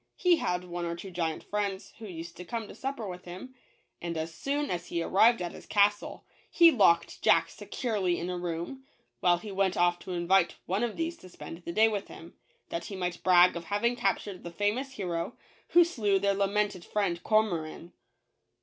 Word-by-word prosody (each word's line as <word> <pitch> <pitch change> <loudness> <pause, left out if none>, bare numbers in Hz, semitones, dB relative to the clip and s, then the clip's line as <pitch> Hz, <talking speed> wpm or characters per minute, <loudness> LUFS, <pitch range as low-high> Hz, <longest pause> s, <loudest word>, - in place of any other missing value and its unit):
He 355 -2 +4
had 180 - -1
one 175 -1 -5
or 170 0 -3
two 190 +3 -9
giant 165 -3 -2
friends 200 -1 -3
who 220 - -8
used 170 -2 -8
to 180 - -7
come 225 +4 -4
to - - -10
supper 265 -5 -4
with 180 -1 -8
him, 185 +9 -9 0.5
and 170 -1 -3
as 160 +1 -4
soon 285 - -2
as 175 - -3
he 170 -1 -2
arrived 220 +2 +4
at 175 - -4
his - - -12
castle, 205 0 +1 0.2
he 335 -1 +7
locked 170 - +3
Jack - - +4
securely 200 -8 -2
in 170 - -3
a 180 - -2
room, 175 +9 -4 0.4
while 175 -1 +4
he 210 +4 -8
went 195 -1 +1
off 175 0 +3
to 185 - -6
invite 175 +1 +2
one 195 +6 0
of 235 -3 -2
these 330 0 -2
to 185 - -14
spend 165 -1 -9
the 170 - -6
day 220 +5 +5
with 205 -3 -2
him, 165 - -12 0.4
that 170 0 -4
he 200 - -6
might 180 -2 -3
brag 180 -1 +6
of 170 0 -5
having 220 +6 0
captured 205 -5 -1
the 170 - -6
famous 210 +10 -1
hero, 180 0 -3 0.3
who 345 - +6
slew 220 - +1
their 200 +1 +2
lamented 200 -1 0
friend 185 -5 -1
Cormoran. 175 -6 0
190 Hz, 200 wpm, -29 LUFS, 175-215 Hz, 0.5 s, he